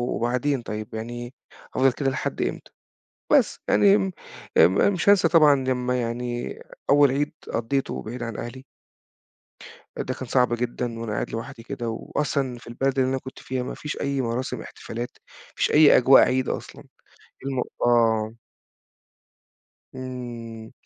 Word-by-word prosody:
وبعدين 125 +3 0
طيب 110 -2 -6
يعني 120 +2 -6 0.4
هافضل 135 0 +4
كده 135 +1 0
لحد 130 - -3
إمتى؟ - - -3 0.6
بس، - - +4
يعني 100 -1 +5
أم 95 -2 0 0.5
أم 90 +4 +6
أ - - +5
مش 190 0 +1
هانسى 200 -4 +6
طبعًا 155 -4 +6
لمّا 125 -1 0
يعني 120 +1 -4 0.3
أول 145 -1 +6
عيد 145 +2 -1 0.2
قضّيته 120 +4 -1
بعيد 120 +3 -6
عن 115 -3 -5
أهلي 130 +3 -7 1.3
ده 130 - -2
كان 130 - -7
صعب 125 0 +2
جدًا 120 0 -3
وأنا 115 -2 -4
قاعد 105 - -2
لوحدي 115 +1 -6
كده 120 -1 -4
وأصلًا 130 +2 -2
في - - -16
البلد 135 +3 -1
اللي 130 0 +3
أنا 135 - 0
كنت 130 0 -10
فيها 130 -1 -3
ما - - -5
فيش 150 - -5
أي 140 -1 0
مراسم 120 +1 -3
احتفالات، 120 +2 -6
ما - - -20
فيش - - +1
أي 150 -1 +7
أجواء 130 +2 +7
عيد 130 0 +1
أصلًا - - -6 0.6
المو 135 -2 -1 0.2
آه. 115 -2 +3 1.6
إمم، 120 -3 -7
125 Hz, 150 wpm, -24 LUFS, 115-135 Hz, 1.6 s, أي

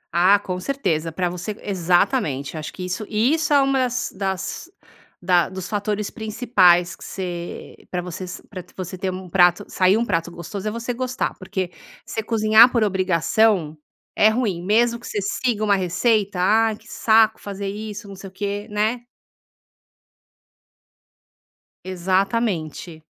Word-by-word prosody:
Ah, 185 +4 +6
com 185 -2 -5
certeza, 180 - -1
pra 180 +2 -1
você 180 +4 -5
exatamente, 175 - 0
acho 155 -1 -5
que 185 - -7
isso 185 +4 -3
e 220 +7 +2
isso 315 -1 0
é 285 - +6
uma 275 0 +2
das 250 -1 -1
das 195 - -4 0.5
da 175 -1 +2
dos 190 -1 -6
fatores 210 0 -2
principais 205 -6 +3
que - - -14
você 175 -2 -6
pra 180 - -2
vocês 180 +1 -6
pra 185 -3 -8
você 185 -1 -5
ter 190 0 -2
um 185 0 -7
prato 175 0 +3
sair 185 +2 +3
um 235 - 0
prato 165 -5 -1
gostoso 175 +4 -6
é - - 0
você 235 +2 -4
gostar. 255 +2 -2
Porque 185 -2 -4 0.3
você 220 - -3
cozinhar 220 +1 +5
por 235 -3 +2
obrigação 185 -2 +2 0.4
é 215 - +5
ruim, 220 -6 -1
mesmo 235 +4 +2
que 240 - -10
você 210 - -2
siga 215 +2 -1
uma 205 -1 +3
receita: 195 +2 +1
"Ah, 220 +4 +3
que 220 +1 -20
saco 220 0 +3
fazer 200 0 -5
isso, 210 0 -7
não 195 - -9
sei 195 0 -10
o - - -26
quê", 205 +2 -4
né. 215 +4 -1 2.8
Exatamente. 185 -3 -1
200 Hz, 155 wpm, -22 LUFS, 180-220 Hz, 2.8 s, Ah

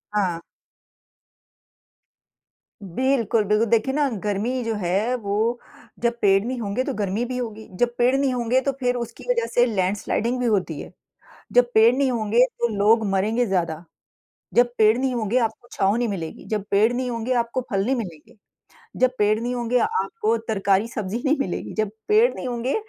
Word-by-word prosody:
हाँ। 185 -5 0 2.4
बिल्कुल, 230 +2 +1
बिल्कुल। 210 +2 +2
देखिए, 230 +4 +2
ना 295 0 +2 0.2
गर्मी 215 +5 -1
जो 225 -1 -1
है 195 +8 0
वो 225 +2 -1 0.4
जब 235 0 +1
पेड़ 195 -1 +4
नहीं 250 +2 -3
होंगे, 220 +3 -1
तो - - -3
गर्मी 205 +3 -1
भी 250 +1 -4
होगी। 220 -3 -5
जब 240 +2 +1
पेड़ 245 +2 +3
नहीं 275 -1 +1
होंगे, 245 +1 +1
तो 275 - 0
फ़िर 250 -1 +1
उसकी 235 -1 -6
वज़ह 475 -2 +2
से 245 - +5
लैंडस्लाइडिंग 210 +3 -1
भी 250 - -1
होती 190 -9 0
है। - - -10 0.6
जब 245 0 +5
पेड़ 225 +2 +6
नहीं 270 -1 +1
होंगे, 230 +1 +3
तो 240 -2 -2
लोग 220 +2 +4
मरेंगे 215 +5 +1
ज़्यादा। 170 -5 -1 0.7
जब 240 0 +4
पेड़ 215 +1 +5
नहीं 260 0 0
होंगे, 230 +1 0
आपको 230 0 -2
छाँव 195 +2 +1
नहीं 240 0 0
मिलेगी। 170 -6 -5
जब 210 -3 -2
पेड़ 215 +4 +4
नहीं 250 +1 -2
होंगे, 230 +1 -2
आपको 235 +1 0
फ़ल 195 -3 +1
नहीं 265 +4 +1
मिलेंगे। 175 -10 -8 0.6
जब 255 0 +5
पेड़ 210 +1 +3
नहीं 245 +2 -2
होंगे, 240 0 0
आपको 455 - 0
तरकारी, 200 0 +1
सब्ज़ी 215 +1 -4
नहीं 290 +2 +3
मिलेगी। 185 - -3
जब 215 -2 -1 0.2
पेड़ 440 +4 +5
नहीं - - -6
होंगे, 245 +2 -2
230 Hz, 175 wpm, -23 LUFS, 205-250 Hz, 2.4 s, पेड़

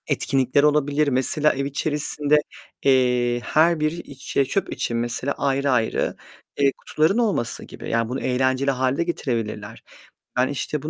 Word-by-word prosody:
Etkinlikler 135 +1 +1
olabilir. 150 0 +2
Mesela, 140 +3 +2
ev 140 +1 -2
içerisinde, 150 +1 +1 0.5
eee, 125 -2 +3
her 165 +1 +3
bir 155 0 +1
iç, 150 -5 -9
eee, 140 - +4
çöp 195 +9 -2
için, 115 - -2
mesela, 120 +4 -2
ayrı 140 0 +1
ayrı, 115 -3 0 0.4
eee, 140 -1 +4
kutuların 160 +7 +1
olması 205 - 0
gibi. - - -9
Yani, 115 -1 0
bunu 130 - -3
eğlenceli 130 +2 +1
hâle 130 +1 0
de - - +1
getirebilirler. 115 -9 -4 0.5
Ben, 125 +1 +3
işte, 145 +1 -3
bu 155 - -5
135 Hz, 155 wpm, -23 LUFS, 125-150 Hz, 0.5 s, eee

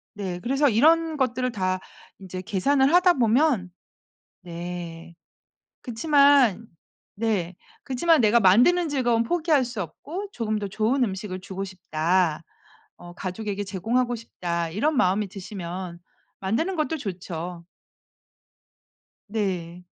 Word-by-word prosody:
네, 185 -3 -4
그래서 275 +4 +2
이런 320 +7 +3
것들을 255 -2 0
다 185 -3 -1 0.4
인제 185 -1 -7
계산을 265 - +2
하다 355 0 +6
보면 240 - +2 0.7
네. 170 -1 -7 0.7
그치만 275 - +3 0.5
네. 200 -5 -1 0.3
그치만 305 +4 +3
'내가 230 +1 +4
만드는 245 - +5
즐거움은 245 -5 +1
포기할 315 -1 +2
수 235 -4 -4
없고 335 - -7
조금 215 - -2
더 205 - -3
좋은 220 +6 +1
음식을 190 -2 -5
주고 195 +1 -5
싶다. 175 -2 0 0.5
어 175 0 -12
가족에게 200 +3 -4
제공하고 230 +6 -1
싶다.' 170 -7 -4
이런 290 - 0
마음이 200 -2 +2
드시면 185 -2 -7 0.4
만드는 230 - -1
것도 320 0 -1
좋죠. 180 - -6 1.7
네. 180 -5 -3
210 Hz, 245 characters per minute, -25 LUFS, 185-265 Hz, 1.7 s, 하다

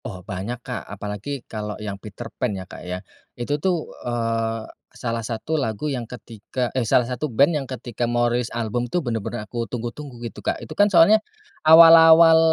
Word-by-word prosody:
Oh 90 -1 -8
banyak 110 +5 -5
Kak - - -4
apalagi 105 +7 -6
kalau 105 -1 -6
yang 105 -2 -5
Peterpan 115 +3 -5
ya 95 - -7
Kak - - -11
ya. 90 0 -5 0.4
Itu 145 +5 -2
tuh, 175 -2 0 0.2
eee, 115 -1 -2 0.3
salah 115 -2 -4
satu 115 +8 -3
lagu 110 +3 -3
yang 125 -2 -3
ketika 120 +1 -5
eh, 130 - +1
salah 120 +2 +3
satu 125 +4 -3
band 140 +8 +4
yang 145 - -1
ketika 120 -2 -5
mau 120 0 +1
rilis 120 0 -1
album 120 +1 -2
tuh 180 - +1
bener-bener 115 -4 -3
aku 120 +1 -4
tunggu-tunggu 120 +3 -6
gitu 105 -2 -8
Kak - - -1
itu 115 - -9
kan 205 0 +4
soalnya, 200 +4 +6 0.4
awal-awal, 165 0 +8
120 Hz, 175 wpm, -22 LUFS, 110-145 Hz, 0.4 s, awal-awal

